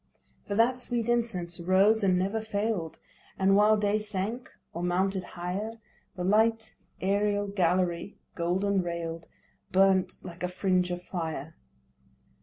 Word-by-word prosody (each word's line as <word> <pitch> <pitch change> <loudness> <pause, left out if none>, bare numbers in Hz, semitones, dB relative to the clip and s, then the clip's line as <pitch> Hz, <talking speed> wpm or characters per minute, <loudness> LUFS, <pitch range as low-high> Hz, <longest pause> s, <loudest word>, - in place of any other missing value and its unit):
For 200 - -2
that 240 +4 +3
sweet 240 -2 -2
incense 205 -8 0
rose 195 +5 +3
and 185 -2 +3
never 195 +4 0
fail'd, 205 -5 -2 0.4
And, 195 +1 +4
while 210 +1 +5
day 210 0 +1
sank 215 +4 -4 0.2
or 170 - -4
mounted 185 +2 0
higher, 180 +6 -4 0.4
The 180 - -4
light 220 +3 +2 0.3
aerial 205 +1 +1
gallery, 180 -1 0 0.2
golden 190 +3 0
rail'd, 165 -1 -5 0.4
Burnt 190 0 +3
like 175 -1 -10
a 180 - 0
fringe 180 0 +1
of 175 0 -4
fire. 160 -4 -4
190 Hz, 130 wpm, -28 LUFS, 180-210 Hz, 0.4 s, while